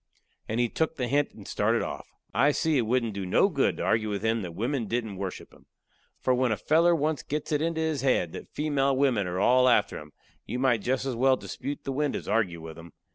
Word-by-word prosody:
And 110 +2 -1
he 120 - +3
took 160 +7 -1
the 125 -4 -2
hint 145 +3 +1
and - - -12
started - - +1
off. - - -6 0.3
I 140 +5 +3
see 160 0 +1
it 115 - 0
wouldn't 120 -2 +1
do 100 0 -4
no 90 - +3
good - - +1
to - - -3
argue 110 -1 +1
with 100 0 -3
him 110 0 +1
that 85 -3 -7
wimmen 120 +3 -2
didn't 110 -3 -3
worship 95 -1 -6
him. - - -21 0.5
For 130 - +1
when 125 -1 +1
a 110 - 0
feller 170 +3 +3
once 155 -3 0
gets 150 +1 -4
it 150 -1 +1
into 165 0 -1
his 160 -3 -1
head 125 -11 +1
that - - -8
female 140 -3 0
wimmen 125 -9 +2
are 90 +1 -3
all 125 +4 +5
after 105 -4 +2
him, 75 -1 -12 0.4
you 125 - -3
might 125 -4 +2
jest 130 +4 -1
as 130 -3 -2
well 130 +2 +3
dispute 145 +1 -6
the 135 - -3
wind 145 +1 -1
as - - -5
argue 100 -7 0
with 80 0 -9
him. 85 -1 -13
125 Hz, 240 wpm, -27 LUFS, 105-145 Hz, 0.5 s, all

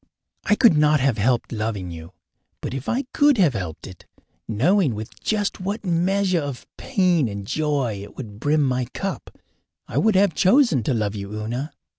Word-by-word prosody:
I 210 - +3
could 220 -6 +5
not 150 0 +4
have 130 -5 +1
helped 120 +3 +1
loving 105 -5 -3
you. 80 +2 -10 0.5
But - - -5
if 135 0 -5
I 255 +4 0
could 290 -2 +4
have 170 -9 +4
helped 85 -7 -5
it, 95 -3 -12 0.4
knowing 140 - +2
with 110 +2 -8
just 210 -2 -1
what 200 +3 -4
measure 185 +1 +1
of 140 -3 -6
pain 180 - +1
and 100 -1 -6
joy 140 -6 -1
it 100 - -12
would 105 -6 -8
brim 150 +4 +2
my 130 -2 0
cup, 195 -1 -4 0.6
I - - -1
would 220 -2 +3
have 195 -2 +4
chosen 190 - +4
to 130 - +1
love 105 -2 -1
you, 100 -1 -6
Una. 120 +8 -4
140 Hz, 180 wpm, -23 LUFS, -, 0.6 s, could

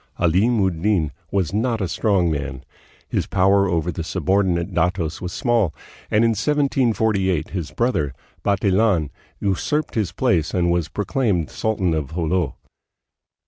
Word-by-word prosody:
Alim 100 +8 +2
ud 85 -4 -2
Din 90 -7 +1 0.2
was 95 -3 -1
not 115 +2 0
a 95 - -1
strong 95 -3 +1
man. 70 -3 -4 0.4
His - - -1
power 100 +1 +3
over 85 0 0
the 85 - -4
subordinate 90 +1 0
datos 85 -1 0
was 90 - -4
small, 115 - +1 0.3
and 105 +2 +3
in 115 - +3
1748 110 - +1
his 85 -5 -3
brother, 115 - 0 0.3
Bantilan, 100 -4 +2 0.3
usurped 140 +10 -1
his 105 -7 -1
place 80 0 +1
and 85 -1 +2
was 85 -2 0
proclaimed 105 - -1
sultan 100 -6 0
of 80 0 -3
Jolo. 85 -3 0
95 Hz, 140 wpm, -22 LUFS, 85-105 Hz, 0.4 s, power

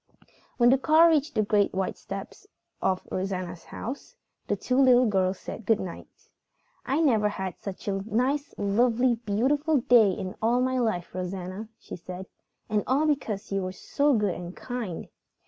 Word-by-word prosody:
When 240 0 +6
the 265 - +4
car 320 +4 +6
reached 305 -1 +1
the 215 - +3
great 205 -2 +2
white 190 0 -1
steps 195 - -8 0.3
of 185 -1 0
Rosanna's 185 -2 -3
house, 255 +5 -7 0.3
the - - +1
two 255 - -1
little 255 -2 +6
girls 190 -3 +1
said 225 - -8
good 225 -2 +4
night. 180 -2 -7 0.8
"I 280 +5 +1
never 220 -9 +3
had 190 -3 -5
such 195 0 -7
a 195 -1 -1
nice, 270 +6 0
lovely, 235 +4 +2
beautiful 265 +8 +1
day 235 -4 +6
in 185 0 -4
all 235 +3 +3
my 255 0 +1
life, 215 -8 -1
Rosanna," 185 +3 -5
she - - -9
said. 180 +2 -8 0.4
"And 210 -1 0
all 275 +4 +2
because 250 -11 -1
you 195 0 0
were 185 0 -4
so 285 +8 +1
good 205 -4 +1
and 175 +1 -7
kind." 240 -9 -5
215 Hz, 165 wpm, -27 LUFS, 190-255 Hz, 0.8 s, When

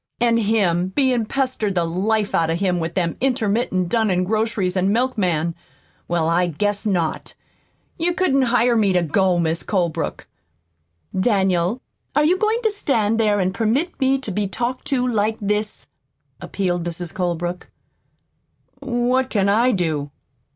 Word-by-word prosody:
An' 235 -1 +3
him 200 -6 +1
bein' 245 +2 +1
pestered 255 -7 -1
the 175 - +2
life 205 +5 0
out 165 -1 +2
of 165 - 0
him 180 -2 +1
with 165 0 -4
them 170 -3 0
intermittent, 220 -7 0
dunnin' 205 -5 +1
grocers 215 -2 0
an' 190 +1 +2
milkmen? 185 -9 0 0.5
Well, 170 -2 0
I 175 +2 +2
guess 205 +6 -2
not! 175 -6 -2 0.6
You 345 +1 0
couldn't 280 -8 +2
hire 240 0 +3
me 205 -4 +3
to 180 -1 +2
go, 180 +3 +2
Mis' 165 -1 0
Colebrook." 175 -6 -2 0.9
"Daniel, 190 +1 +1 0.3
are 295 +1 +4
you 360 +4 +2
going 440 +3 +1
to 440 - +2
stand 230 - 0
there 210 -2 +2
and 185 0 0
permit 245 - -1
me 265 0 +3
to 260 -6 -6
be 205 +1 -1
talked 240 +6 -3
to 255 -2 0
like 220 -2 0
this?" 210 +1 -1 0.5
appealed 175 -3 -2
Mrs. 175 0 -5
Colebrook. 175 0 -3 1.1
"What 255 0 0
can 200 -2 +1
I 235 +5 +3
do?" 160 -8 -1
205 Hz, 150 wpm, -21 LUFS, 180-240 Hz, 1.1 s, are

